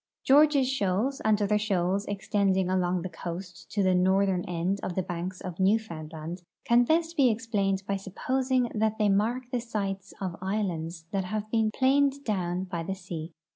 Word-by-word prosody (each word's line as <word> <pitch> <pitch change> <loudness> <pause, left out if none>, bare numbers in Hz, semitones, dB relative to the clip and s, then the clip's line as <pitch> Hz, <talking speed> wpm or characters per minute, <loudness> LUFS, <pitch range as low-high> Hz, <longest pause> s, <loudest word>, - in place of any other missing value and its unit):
George's 285 -1 +5
shoals 250 +1 0
and 215 -1 +3
other 210 +1 +2
shoals 195 -1 0
extending 195 -2 +1
along 180 -1 +1
the - - -2
coast 180 +1 -7
to 205 - +1
the 185 -1 +3
north 190 +2 +3
ern 180 -2 0
end 180 +3 -1
of 175 - -4
the 190 - 0
banks 180 +1 -5
of 180 -1 -7
Newfoundland 170 -5 -1 0.2
can 240 +1 +5
best 330 +3 +1
be 275 -5 +5
explained 205 -4 0
by 200 - 0
supposing 255 +6 -1
that 220 0 0
they 210 -1 +3
mark 220 +6 +1
the 250 - 0
sites 195 -4 -4
of 185 -3 -4
islands 175 -5 -2
that 195 -2 -1
have 215 +2 -4
been 225 -2 +2
planed 275 +4 +2
down 185 -5 -1
by 175 -3 -4
the 190 +4 -3
sea. 175 -3 -7
195 Hz, 175 wpm, -28 LUFS, 180-225 Hz, 0.2 s, George's